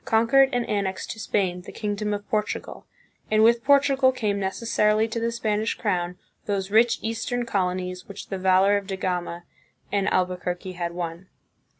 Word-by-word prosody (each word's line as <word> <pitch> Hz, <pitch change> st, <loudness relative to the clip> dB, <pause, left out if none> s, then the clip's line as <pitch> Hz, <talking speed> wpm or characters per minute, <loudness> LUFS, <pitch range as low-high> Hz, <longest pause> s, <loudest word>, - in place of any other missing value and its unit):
conquered 230 Hz, +5 st, +4 dB
and 245 Hz, -1 st, -1 dB
annexed 200 Hz, -3 st, -2 dB
to 220 Hz, -, -8 dB
Spain 185 Hz, -4 st, -1 dB
the -, -, -10 dB
kingdom 210 Hz, -1 st, -3 dB
of 205 Hz, 0 st, -4 dB
Portugal, 210 Hz, -1 st, -3 dB, 0.4 s
and 215 Hz, 0 st, +4 dB
with 235 Hz, +1 st, +4 dB
Portugal 275 Hz, -1 st, +4 dB
came 210 Hz, -6 st, -1 dB
necessarily 210 Hz, +2 st, +1 dB
to 230 Hz, +1 st, -3 dB
the 230 Hz, 0 st, -1 dB
Spanish 220 Hz, -1 st, -1 dB
crown 180 Hz, -4 st, -1 dB, 0.3 s
those 200 Hz, -1 st, -2 dB
rich 230 Hz, +2 st, +4 dB
eastern 230 Hz, +2 st, -2 dB
colonies 185 Hz, -3 st, -2 dB
which 200 Hz, 0 st, -9 dB
the 195 Hz, -, -3 dB
valor 190 Hz, +2 st, +4 dB
of 200 Hz, -1 st, -5 dB
Da 195 Hz, -, -3 dB
Gama 175 Hz, -2 st, -3 dB, 0.5 s
and 200 Hz, -1 st, +1 dB
Albuquerque 180 Hz, 0 st, -1 dB
had 175 Hz, -1 st, -4 dB
won. 170 Hz, +1 st, -5 dB
205 Hz, 165 wpm, -25 LUFS, 185-225 Hz, 0.5 s, conquered